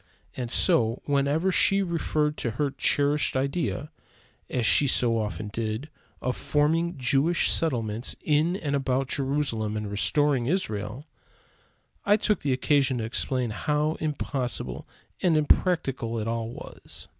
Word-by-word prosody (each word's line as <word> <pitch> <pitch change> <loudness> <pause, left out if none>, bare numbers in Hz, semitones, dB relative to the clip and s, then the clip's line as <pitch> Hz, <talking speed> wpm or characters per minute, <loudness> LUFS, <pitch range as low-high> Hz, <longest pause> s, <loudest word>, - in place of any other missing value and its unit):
And 125 -2 -4
so, 115 0 +2
whenever 145 +6 +1
she 195 +2 +5
referred 155 -4 -1
to 120 - -2
her 145 -2 0
cherished 145 -1 +1
idea, 145 +2 -2 0.6
as 125 -3 -1
she 140 - +5
so 120 -3 +2
often 105 0 -4
did, 115 +6 -3 0.3
of 125 0 -1
forming 155 +4 0
Jewish 140 +6 +2
settlements 115 -7 0
in 155 +4 +1
and 145 -7 -2
about 135 -1 0
Jerusalem 135 -7 -1
and 105 -1 -4
restoring 135 +4 +1
Israel, 125 - -2 1.0
I 205 +1 +4
took 210 -2 0
occasion 135 0 +2
to 115 - -3
explain 120 +1 -2
how 150 +7 0
impossible 130 - -3 0.3
and 170 -4 +3
impractical 140 -7 +1
it 110 0 -3
all 115 0 -2
was. 120 - -10
140 Hz, 130 wpm, -26 LUFS, 115-150 Hz, 1.0 s, she